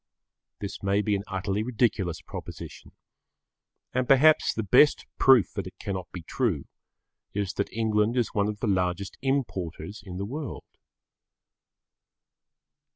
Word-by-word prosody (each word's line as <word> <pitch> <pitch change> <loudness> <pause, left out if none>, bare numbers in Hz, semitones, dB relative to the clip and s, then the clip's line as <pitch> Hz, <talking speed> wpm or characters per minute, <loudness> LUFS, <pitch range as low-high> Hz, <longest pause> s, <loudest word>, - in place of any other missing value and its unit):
This 100 - -6
may 100 +1 +1
be 105 -1 +1
an 100 - -3
utterly 95 +1 -2
ridiculous 110 -7 0
proposition, - - -9 1.0
and 130 0 0
perhaps 150 +3 +6
the 110 - -3
best 125 +8 +5
proof 130 - +6
that - - -4
it - - -12
cannot 95 -2 -5
be 90 - -7
true, 100 - -1 0.7
is 100 -2 -1
that 100 - -2
England 110 +1 +1
is 120 - +2
one 100 -1 +2
of 105 0 -6
the 120 - 0
largest 95 0 0
importers 110 - -2
in 90 -2 -7
the 100 - -3
world. 145 +6 -6
105 Hz, 135 wpm, -27 LUFS, 95-125 Hz, 1.0 s, perhaps